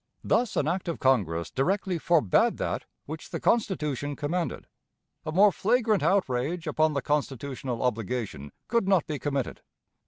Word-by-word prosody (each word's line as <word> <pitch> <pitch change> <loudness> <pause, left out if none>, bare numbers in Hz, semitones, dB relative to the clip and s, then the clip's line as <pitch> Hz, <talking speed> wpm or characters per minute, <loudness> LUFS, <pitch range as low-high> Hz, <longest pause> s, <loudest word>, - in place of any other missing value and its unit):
Thus 245 -1 +1
an 145 - +1
act 175 +3 -1
of 170 - -2
Congress 85 -11 +1
directly 185 +5 0
forbade 155 - +3
that - - -2 0.2
which 155 +2 -7
the - - -4
Constitution 150 - 0
commanded. 165 +4 -2 0.6
A - - -1
more 200 +5 +6
flagrant 220 +1 +2
outrage 165 -2 +1
upon 155 0 +2
the 140 -3 -2
constitutional 135 -4 -2
obligation 115 - -2 0.2
could 235 -4 +1
not 190 -5 +3
be 150 -3 -4
committed. 140 -3 -2
150 Hz, 145 wpm, -27 LUFS, 130-185 Hz, 0.6 s, more